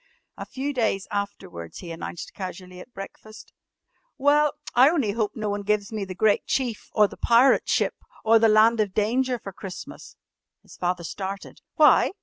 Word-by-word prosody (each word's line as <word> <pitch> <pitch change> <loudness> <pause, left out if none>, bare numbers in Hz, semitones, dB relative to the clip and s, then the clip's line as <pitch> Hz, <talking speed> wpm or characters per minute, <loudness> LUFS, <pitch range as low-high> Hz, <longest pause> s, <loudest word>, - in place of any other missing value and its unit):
A - - -8
few 275 +2 -4
days 220 -6 0
afterwards 195 - -5
he 170 - -8
announced 165 +1 -7
casually 185 -1 -8
at 215 - -12
breakfast: 215 +1 -11 0.6
"Well, 290 +1 +3 0.2
I 255 +4 +6
only 285 -11 0
hope 210 -1 -1
no 215 -2 -3
one 205 0 -2
gives 205 +1 -1
me 210 -2 -3
'The 185 -1 -8
Great 210 +1 +2
Chief,' 245 -5 -2
or 210 -1 +5
'The - - -13
Pirate 240 +3 +4
Ship,' - - 0 0.2
or 225 +1 +6
'The 225 0 +4
Land 220 +2 +5
of 205 -3 0
Danger' 245 +4 +1
for 195 -4 -9
Christmas." 190 -1 -9 0.5
His - - -15
father 180 0 -2
started. 195 +3 -6
"Why?" - - +5
210 Hz, 170 wpm, -25 LUFS, 195-235 Hz, 0.6 s, I